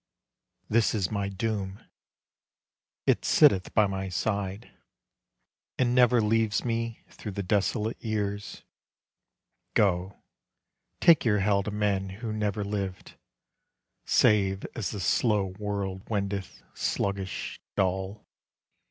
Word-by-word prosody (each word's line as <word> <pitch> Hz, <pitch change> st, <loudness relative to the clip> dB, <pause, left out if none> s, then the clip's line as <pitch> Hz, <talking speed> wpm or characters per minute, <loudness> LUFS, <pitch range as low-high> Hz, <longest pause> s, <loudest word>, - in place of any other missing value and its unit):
This 115 Hz, 0 st, +2 dB
is 95 Hz, -4 st, 0 dB
my 100 Hz, -2 st, -1 dB
doom, 100 Hz, -1 st, -3 dB, 1.3 s
it -, -, +2 dB
sitteth 100 Hz, -12 st, +4 dB
by 105 Hz, -, +6 dB
my 95 Hz, -1 st, -3 dB
side, 100 Hz, +2 st, -2 dB, 1.1 s
And 125 Hz, -2 st, +2 dB
never 125 Hz, -1 st, +5 dB
leaves 110 Hz, +1 st, +1 dB
me 115 Hz, -1 st, -2 dB
through 105 Hz, -, -7 dB
the 100 Hz, -, -3 dB
desolate 105 Hz, +3 st, 0 dB
years. 105 Hz, -2 st, -3 dB, 1.1 s
Go, 95 Hz, -1 st, +2 dB, 0.8 s
take 170 Hz, -3 st, +6 dB
your 110 Hz, -3 st, +3 dB
hell 100 Hz, 0 st, +3 dB
to 100 Hz, -, -4 dB
men 100 Hz, -2 st, 0 dB, 0.2 s
who 110 Hz, -, -2 dB
never 105 Hz, -1 st, -1 dB
lived, 100 Hz, -2 st, -4 dB, 0.9 s
Save 95 Hz, -2 st, +3 dB
as 110 Hz, -, -3 dB
the 105 Hz, -, -5 dB
slow 95 Hz, +1 st, +1 dB
world 100 Hz, -2 st, -3 dB
wendeth, 100 Hz, -3 st, -3 dB
sluggish, 100 Hz, -1 st, -2 dB, 0.2 s
dull. 95 Hz, +2 st, -1 dB
100 Hz, 110 wpm, -28 LUFS, 95-110 Hz, 1.3 s, by